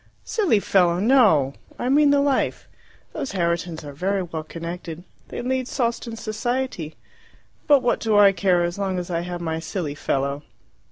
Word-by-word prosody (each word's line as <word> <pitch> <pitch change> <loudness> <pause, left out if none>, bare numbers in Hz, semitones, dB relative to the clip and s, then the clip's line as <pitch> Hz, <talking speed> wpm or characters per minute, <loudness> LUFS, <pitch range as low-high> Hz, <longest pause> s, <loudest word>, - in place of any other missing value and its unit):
"Silly 380 - +2
fellow, 180 -3 +2
no! 205 - +4 0.2
I 245 - -3
mean 290 +2 +5
the 285 0 +4
life. 280 -1 0 0.5
Those 280 -8 -4
Herritons 170 -2 -1
are 145 -1 -8
very 190 +6 -1
well 165 -2 -5
connected. 170 +1 -7 0.2
They - - -6
lead 255 0 -1
Sawston 235 -2 -2
society. 225 -6 -3 0.7
But 285 -4 +5
what 240 - +1
do 220 -2 +1
I 200 -1 +7
care, 180 -3 +1
so 200 - -7
long 190 -2 -1
as 180 0 -4
I 170 - 0
have 175 0 -5
my 160 -1 -2
silly 160 -2 -4
fellow!" 140 0 -2
190 Hz, 165 wpm, -23 LUFS, 170-240 Hz, 0.7 s, I